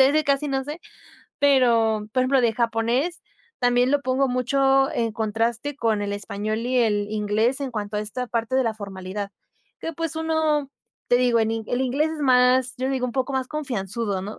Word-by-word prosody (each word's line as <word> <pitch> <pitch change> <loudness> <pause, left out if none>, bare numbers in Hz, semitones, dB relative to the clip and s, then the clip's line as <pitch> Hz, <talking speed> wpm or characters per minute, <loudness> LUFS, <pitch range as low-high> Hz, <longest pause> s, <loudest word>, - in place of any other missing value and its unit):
de 265 - +7
ese 305 +2 +2
casi 280 0 +1
no 270 -1 0
sé. 300 +4 -7 0.6
Pero, 230 -7 +3
por 255 - +2
ejemplo, 265 +1 +3
de 235 -2 +2
japonés, 235 +8 0 0.4
también 245 0 +3
lo 290 0 +2
pongo 260 0 +1
mucho 270 +2 +2
en 230 -2 0
contraste 230 +5 -1
con 220 -6 0
el 200 0 -2
español 205 +1 -3
y 250 +2 0
el 210 -3 +1
inglés, 215 +5 +1
en 275 -2 -3
cuanto 210 -2 -4
a - - 0
esta 220 +4 -4
parte 230 +1 -2
de 265 - +3
la 225 -2 0
formalidad. 200 -1 -6 0.5
Que 330 - -4
pues, 330 0 -4
uno 315 -3 0 0.4
te 245 - +5
digo 245 -1 +3
el 225 0 -1
el 245 - -1
inglés 275 +5 +1
es 315 - -6
más, 250 -2 +4
yo 260 0 -2
le 270 - -1
digo 260 -2 -1
un 240 - -5
poco 265 +2 -1
más 260 -1 -1
confianzudo, 225 -8 -3
¿no?, 210 +3 -7
250 Hz, 200 wpm, -24 LUFS, 220-270 Hz, 0.6 s, de